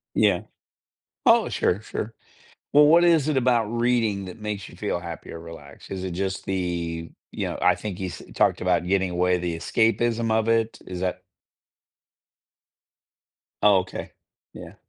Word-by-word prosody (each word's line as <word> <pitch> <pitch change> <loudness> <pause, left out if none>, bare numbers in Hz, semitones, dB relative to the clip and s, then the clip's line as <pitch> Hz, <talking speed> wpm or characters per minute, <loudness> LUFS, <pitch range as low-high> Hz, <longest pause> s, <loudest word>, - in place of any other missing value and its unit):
Yeah. 100 -5 +3 0.8
Oh, - - +5
sure, 100 +5 0
sure. 110 +1 -5 0.6
Well, 150 +1 +7
what 170 +3 +6
is 165 -4 +4
it 150 -3 +1
about 120 -3 +3
reading 115 -3 0
that 90 +3 -9
makes 105 -2 -4
you - - -13
feel 100 -4 -2
happy 85 -2 -8
or 85 - -7
relaxed? 80 -4 -12
Is 95 -1 -4
it 95 - -3
just 95 +2 -3
the 85 -3 -3 0.2
you - - -2
know, - - -4
I - - +6
think 100 -4 -6
you 95 - -2
s 90 - -8
talked - - +2
about 90 -1 +1
getting 95 0 +1
away, 90 +1 +1
the 85 -1 -2
escapism 115 +4 +1
of 110 0 +2
it, 115 0 +1
is 90 -1 -6
that 90 -1 -2 2.4
Oh, - - +6
okay. - - -6 0.4
Yeah. - - -10
95 Hz, 160 wpm, -24 LUFS, 90-115 Hz, 2.4 s, Well